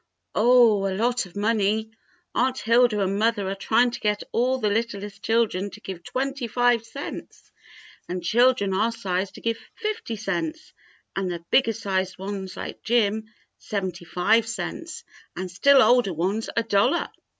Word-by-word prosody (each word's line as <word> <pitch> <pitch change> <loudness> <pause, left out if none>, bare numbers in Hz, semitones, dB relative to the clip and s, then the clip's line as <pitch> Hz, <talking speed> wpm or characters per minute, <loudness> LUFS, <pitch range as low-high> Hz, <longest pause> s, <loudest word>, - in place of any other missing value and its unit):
"Oh, 225 -3 +5
a 190 -1 -2
lot 240 -1 +1
of 175 - -19
money. 215 +1 +1 0.4
Aunt 260 +1 +1
Hilda 230 -2 +3
and 195 +1 0
mother 215 -3 +1
are 195 - -1
trying 230 +5 +2
to - - -6
get 210 -1 0
all 255 +3 +1
the 215 -5 0
littlest 205 -2 -3
children 220 -4 +1
to - - -12
give 185 -3 -7
twenty 270 +1 -3
five 245 0 +2
cents, 275 +5 -8 0.6
and 180 -1 -3
children 235 0 +3
our 215 +5 +2
size 195 -4 -2
to - - -12
give 230 0 -1 0.2
fifty 425 - -3
cents, 220 - -4 0.4
and 195 -1 -1
the 170 -1 -6
bigger 245 -4 +4
sized 190 -4 -2
ones 190 0 -6
like - - -7
Jim, 220 -2 +1 0.3
seventy 185 -4 -4
five 220 +7 +2
cents, 335 - -5 0.3
and 185 0 -5
still 270 +8 +6
older 245 -6 +4
ones 195 +7 -1
a 230 - +3
dollar." 225 +9 +2
220 Hz, 160 wpm, -24 LUFS, 195-240 Hz, 0.6 s, still